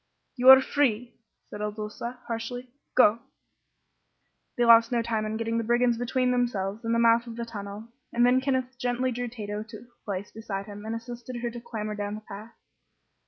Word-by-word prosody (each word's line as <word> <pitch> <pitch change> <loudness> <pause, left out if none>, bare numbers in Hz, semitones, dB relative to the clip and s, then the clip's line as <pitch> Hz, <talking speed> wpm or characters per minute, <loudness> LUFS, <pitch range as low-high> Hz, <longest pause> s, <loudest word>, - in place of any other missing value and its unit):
"You 255 0 +5
are 265 0 +11
free," 250 -4 0 0.4
said 210 - -6
Il 210 0 -2
Duca, 220 +3 -6
harshly. 240 +2 -5 0.2
"Go!" 230 -3 +5 1.4
They 240 - +3
lost 230 0 +7
no 235 -1 +1
time 220 -2 -1
in 215 +1 -3
getting 230 0 -1
the - - -1
brigands 240 +1 +2
between 250 +1 +1
themselves 225 -4 -1
and 230 0 0
the - - +2
mouth 235 0 +4
of 230 - -7
the 235 0 -4
tunnel, 205 -1 -7 0.2
and 240 0 +3
then 250 +1 +4
Kenneth 260 -2 -1
gently 245 +1 0
drew 245 +1 -3
Tato 210 -3 -5
to 220 +1 -9
a 240 +2 -20
place 200 -1 -4
beside 205 -3 -5
him 205 +1 -9
and 225 - -2
assisted 240 +1 -7
her 240 -1 -2
to 240 0 -8
clamber 220 -3 -5
down 205 0 -4
the 215 - -8
path. 215 +2 -10
230 Hz, 195 wpm, -27 LUFS, 215-245 Hz, 1.4 s, are